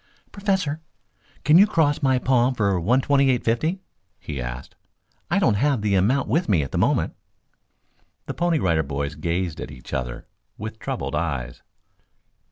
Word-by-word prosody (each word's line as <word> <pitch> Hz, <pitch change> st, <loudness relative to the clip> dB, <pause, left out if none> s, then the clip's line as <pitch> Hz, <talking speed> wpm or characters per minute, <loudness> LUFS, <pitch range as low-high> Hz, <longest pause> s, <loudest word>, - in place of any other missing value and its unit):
"Professor, 190 Hz, -7 st, -1 dB, 0.6 s
can 155 Hz, +4 st, +6 dB
you 205 Hz, -, +7 dB
cross 160 Hz, -8 st, +1 dB
my 130 Hz, -2 st, +3 dB
palm 125 Hz, 0 st, +2 dB
for 100 Hz, -5 st, +1 dB
one 120 Hz, +10 st, +2 dB
twenty 140 Hz, 0 st, +3 dB
eight 125 Hz, -2 st, +1 dB
fifty?" 160 Hz, +12 st, 0 dB, 0.4 s
he 70 Hz, -4 st, -5 dB
asked. -, -, -6 dB, 0.6 s
"I 175 Hz, -, +2 dB
don't 170 Hz, -, +3 dB
have 130 Hz, +1 st, +1 dB
the 105 Hz, -2 st, +1 dB
amount 110 Hz, +9 st, +2 dB
with 155 Hz, -, 0 dB
me 85 Hz, -8 st, +3 dB
at 70 Hz, -, -7 dB
the -, -, -1 dB
moment." -, -, +1 dB, 1.1 s
The -, -, -4 dB
Pony 175 Hz, -1 st, +1 dB
Rider 85 Hz, -, +2 dB
Boys 70 Hz, 0 st, -3 dB
gazed 85 Hz, +2 st, -2 dB
at -, -, -6 dB
each 65 Hz, -, -11 dB
other 60 Hz, -2 st, -4 dB, 0.3 s
with 110 Hz, +1 st, -7 dB
troubled -, -, -4 dB
eyes. 70 Hz, -6 st, -3 dB
115 Hz, 165 wpm, -23 LUFS, -, 1.1 s, you